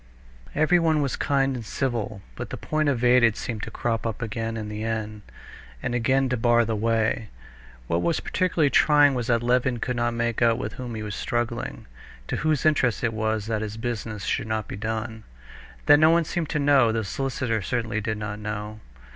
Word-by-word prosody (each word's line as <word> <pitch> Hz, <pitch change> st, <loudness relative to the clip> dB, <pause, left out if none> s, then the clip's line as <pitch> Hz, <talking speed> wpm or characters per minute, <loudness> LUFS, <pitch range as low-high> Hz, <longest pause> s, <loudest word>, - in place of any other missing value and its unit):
Everyone 160 Hz, -1 st, +3 dB
was 135 Hz, -, -1 dB
kind 135 Hz, -1 st, +1 dB
and 120 Hz, -, -5 dB
civil, 110 Hz, -4 st, -3 dB
but -, -, -6 dB
the -, -, -5 dB
point 155 Hz, -1 st, 0 dB
evaded 120 Hz, -3 st, +4 dB
seemed 110 Hz, -3 st, -4 dB
to -, -, -5 dB
crop 115 Hz, 0 st, -2 dB
up 110 Hz, -, -4 dB
again 115 Hz, 0 st, -3 dB
in 110 Hz, -1 st, -4 dB
the 105 Hz, +1 st, -5 dB
end, 110 Hz, -1 st, -3 dB, 0.6 s
and 125 Hz, -, -1 dB
again 130 Hz, +3 st, +2 dB
to 125 Hz, -, 0 dB
bar 120 Hz, 0 st, +3 dB
the 110 Hz, 0 st, -1 dB
way. 110 Hz, 0 st, 0 dB, 0.6 s
What 85 Hz, +7 st, 0 dB
was 170 Hz, -, +1 dB
particularly 170 Hz, -6 st, +1 dB
trying, 145 Hz, -2 st, +5 dB
was 120 Hz, -3 st, -2 dB
that 115 Hz, -1 st, +2 dB
Levin 125 Hz, +1 st, +2 dB
could 125 Hz, +2 st, -2 dB
not 120 Hz, 0 st, 0 dB
make 120 Hz, -1 st, -1 dB
out 115 Hz, -1 st, +4 dB
with -, -, -4 dB
whom 125 Hz, -2 st, -6 dB
he 110 Hz, -, -5 dB
was 105 Hz, -1 st, -5 dB
struggling, 120 Hz, +3 st, -3 dB, 0.4 s
to -, -, -1 dB
whose 155 Hz, -1 st, 0 dB
interest 130 Hz, -8 st, +2 dB
it 115 Hz, -1 st, +1 dB
was 110 Hz, -1 st, -1 dB
that 110 Hz, -1 st, -1 dB
his 110 Hz, 0 st, -5 dB
business 110 Hz, -3 st, -4 dB
should 110 Hz, -, -1 dB
not 110 Hz, -2 st, -2 dB
be -, -, -6 dB
done. 110 Hz, +1 st, -4 dB, 0.6 s
That 145 Hz, -, +7 dB
no 155 Hz, +1 st, +6 dB
one 165 Hz, 0 st, +3 dB
seemed 165 Hz, 0 st, -3 dB
to 150 Hz, -, -1 dB
know; 140 Hz, -5 st, +4 dB
the 110 Hz, 0 st, -1 dB
solicitor 120 Hz, +1 st, -2 dB
certainly 115 Hz, 0 st, -2 dB
did 110 Hz, 0 st, -2 dB
not 105 Hz, 0 st, -5 dB
know. 105 Hz, 0 st, -5 dB
115 Hz, 195 wpm, -25 LUFS, 110-130 Hz, 0.6 s, That